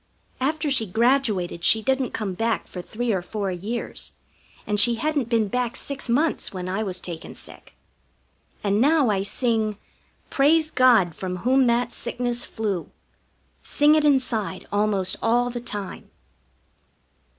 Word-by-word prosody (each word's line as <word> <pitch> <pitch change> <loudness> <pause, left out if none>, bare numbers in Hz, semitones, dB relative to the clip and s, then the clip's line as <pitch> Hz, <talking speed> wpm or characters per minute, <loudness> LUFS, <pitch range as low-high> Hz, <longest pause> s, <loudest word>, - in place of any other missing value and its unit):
After 300 +2 0
she 230 -5 +2
graduated 220 -5 +1
she 220 +4 +3
didn't 265 -1 +1
come 210 -4 -3
back 225 +3 -1
for 180 - -7
three 235 +6 -3
or 190 - 0
four 195 +1 -3
years, 205 +7 -5 0.5
and 210 -1 0
she 235 +3 +5
hadn't 290 -1 -1
been 225 -3 +2
back 245 +3 -2
six 275 -3 -5
months 295 +7 +1
when 185 -2 -5
I 190 +3 -2
was 185 -4 -3
taken 170 -3 -7
sick. - - -11 0.9
And 205 +1 +1
now 290 -3 +4
I 195 -2 0
sing: 220 0 0 0.5
"Praise 310 +3 +3
God 235 - +4
from 185 +1 -4
whom 260 0 +4
that 240 0 +1
sickness 245 0 -2
flew." 205 -6 -3 0.7
Sing 295 +1 +3
it 310 -1 +3
inside 250 -9 +1
almost 200 -2 +1
all 245 +2 +2
the 240 0 -5
time. 205 -5 -5
230 Hz, 145 wpm, -24 LUFS, 200-255 Hz, 0.9 s, she